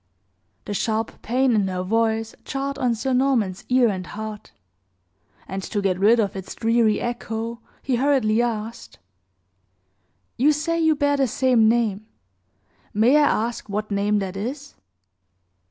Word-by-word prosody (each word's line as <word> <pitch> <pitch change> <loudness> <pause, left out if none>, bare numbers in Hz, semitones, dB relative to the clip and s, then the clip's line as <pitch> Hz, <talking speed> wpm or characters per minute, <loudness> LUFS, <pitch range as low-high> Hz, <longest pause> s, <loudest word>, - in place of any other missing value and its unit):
The 205 - -4
sharp 220 +2 -2
pain 255 +2 +1
in 205 -3 +2
her 185 -1 -3
voice 225 +2 0
jarred 275 0 -4
on 245 -3 +1
Sir 260 +4 -2
Norman's 250 -8 +1
ear 250 -1 +4
and 185 -3 -4
heart; 215 0 -7 1.0
and, 190 +1 -4
to 205 - -3
get 190 -2 0
rid 220 +4 +5
of 200 -3 0
its 190 -1 -7
dreary 225 -1 +2
echo, 235 -1 -4 0.2
he 255 -2 0
hurriedly 245 -5 +2
asked: 230 -1 -4 1.4
"You 285 +5 +4
say 335 +3 -1
you 320 -1 +3
bear 285 -1 +1
the 270 -1 +2
same 240 -2 +3
name. 215 -3 0 0.9
May 230 +6 +4
I 295 -1 +5 0.2
ask 235 -3 -8
what 210 +1 -3
name 205 +1 +1
that 195 -2 -3
is?" 265 +8 -5
225 Hz, 145 wpm, -23 LUFS, 210-255 Hz, 1.4 s, rid